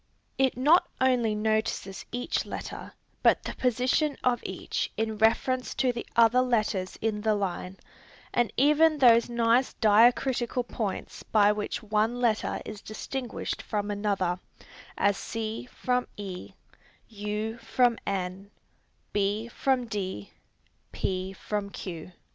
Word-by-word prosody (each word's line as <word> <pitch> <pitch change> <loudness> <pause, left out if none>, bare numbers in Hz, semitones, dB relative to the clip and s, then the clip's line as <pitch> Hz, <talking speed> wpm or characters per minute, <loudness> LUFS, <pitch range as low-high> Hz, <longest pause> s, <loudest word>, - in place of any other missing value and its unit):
It 265 -2 +2
not 300 +7 +5
only 245 -4 +2
notices 215 -2 -1
each 245 +1 -1
letter, - - -7 0.3
but - - +4
the - - -4
position 255 +4 +1
of 245 -1 +2
each - - -3
in 220 -1 -2
reference 250 +3 +2
to 255 -2 +2
the 235 - -6
other 235 +2 +5
letters 215 -6 0
in 215 -1 -1
the 215 0 +2
line, 190 -1 -3 0.6
and 240 -1 +2
even 300 +3 +5
those 235 -3 +6
nice 235 +2 +2
diacritical 240 +3 +3
points 215 -4 -4
by 205 -1 +4
which 210 +3 -3
one 215 +3 0
letter 230 -3 0
is 215 -1 -7
distinguished 245 +3 -5
from 205 -1 -2
another, 200 -4 0 0.6
as 200 0 +2
c 225 +1 -4
from 250 0 -1
e, 190 -3 -7 0.5
u 215 +1 -4
from 235 +1 +2
n, 190 0 -3 0.6
b 205 +3 0
from 260 +1 0
d, 190 - -4 0.6
p 185 0 -2
from 200 +1 -4
q. 175 -3 -7
220 Hz, 125 wpm, -28 LUFS, 205-245 Hz, 0.6 s, those